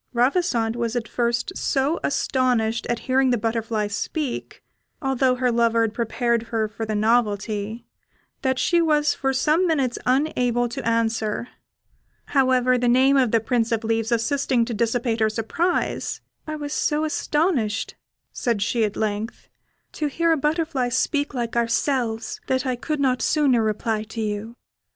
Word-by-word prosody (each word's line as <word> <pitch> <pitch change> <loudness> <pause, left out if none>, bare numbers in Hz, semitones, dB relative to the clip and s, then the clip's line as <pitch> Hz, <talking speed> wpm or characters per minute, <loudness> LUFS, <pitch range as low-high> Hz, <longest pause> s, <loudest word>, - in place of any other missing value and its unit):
Ravissante 245 -3 +1
was 235 0 -2
at 235 -2 -2
first 240 +10 -1
so 280 +4 0
astonished 240 -5 0
at 240 -1 -2
hearing 265 0 +3
the 245 - +2
butterfly 225 -1 -1
speak, 250 +7 -4 0.4
although 265 -2 +1
her 250 -1 +1
lover 230 -1 +2
had 220 -2 -1
prepared 235 0 0
her 220 -2 0
for 220 +1 -6
the 215 - -2
novelty, 215 0 0 0.6
that 260 -2 0
she 345 +6 +2
was 300 -2 +2
for 270 - -1
some 310 +7 +2
minutes 275 -7 0
unable 250 -3 +1
to 235 - -5
answer; 230 0 0 0.8
however, 255 -2 +3
the 245 - +1
name 260 +3 +4
of 260 -3 +3
the 230 - +3
Prince 230 +1 0
of 230 0 0
Leaves 225 +1 0
assisting 240 +1 +1
to 235 - -4
dissipate 230 +1 0
her 220 -1 +3
surprise, 235 - -1 0.3
"I 310 - -3
was 295 -1 -5
so 300 +1 0
astonished," 295 - 0 0.4
said 230 -5 0
she 230 +1 0
at 210 -1 -1
length, 215 +1 -3 0.4
"to 305 - -2
hear 335 +4 +1
a - - +5
butterfly 300 -3 0
speak 290 +3 0
like 235 -2 -3
ourselves, 235 0 0
that 260 +1 0
I 255 -1 0
could 300 +5 -3
not 255 -2 +1
sooner 275 -6 +3
reply 215 0 -1
to 225 +1 -6
you. 215 +2 -4
240 Hz, 155 wpm, -23 LUFS, 225-270 Hz, 0.8 s, a